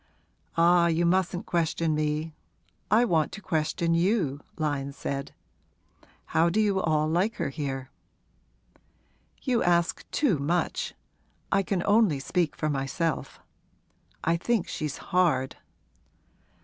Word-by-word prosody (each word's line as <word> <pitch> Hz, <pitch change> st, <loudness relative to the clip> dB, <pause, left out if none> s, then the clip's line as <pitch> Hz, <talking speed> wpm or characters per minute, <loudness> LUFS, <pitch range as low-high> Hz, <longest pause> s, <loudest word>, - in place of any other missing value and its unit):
'Ah, 170 Hz, +1 st, +5 dB
you 170 Hz, +1 st, +2 dB
mustn't 180 Hz, 0 st, +1 dB
question 165 Hz, -1 st, 0 dB
me 155 Hz, +1 st, -1 dB, 0.6 s
I 225 Hz, +4 st, +5 dB
want 160 Hz, -8 st, +1 dB
to -, -, -6 dB
question 165 Hz, -1 st, 0 dB
you,' 170 Hz, -, +1 dB, 0.2 s
Lyon 145 Hz, -3 st, -2 dB
said. 140 Hz, 0 st, -4 dB, 0.9 s
'How 165 Hz, +2 st, +2 dB
do 195 Hz, +6 st, 0 dB
you 200 Hz, -3 st, +2 dB
all 155 Hz, -2 st, +1 dB
like 185 Hz, +8 st, +1 dB
her -, -, -2 dB
here?' 135 Hz, -2 st, -4 dB, 1.5 s
'You 250 Hz, -4 st, +1 dB
ask 170 Hz, -1 st, +1 dB
too 230 Hz, -, +1 dB
much! 170 Hz, +5 st, -1 dB, 0.6 s
I 195 Hz, -, +4 dB
can 190 Hz, -2 st, -1 dB
only 205 Hz, -8 st, +4 dB
speak 165 Hz, +3 st, 0 dB
for 155 Hz, -, -2 dB
myself. 145 Hz, +3 st, -2 dB, 0.8 s
I 165 Hz, +1 st, +2 dB
think 225 Hz, +2 st, 0 dB
she's 150 Hz, -3 st, -4 dB, 0.2 s
hard.' 155 Hz, -8 st, +2 dB
165 Hz, 120 wpm, -27 LUFS, 150-185 Hz, 1.5 s, Ah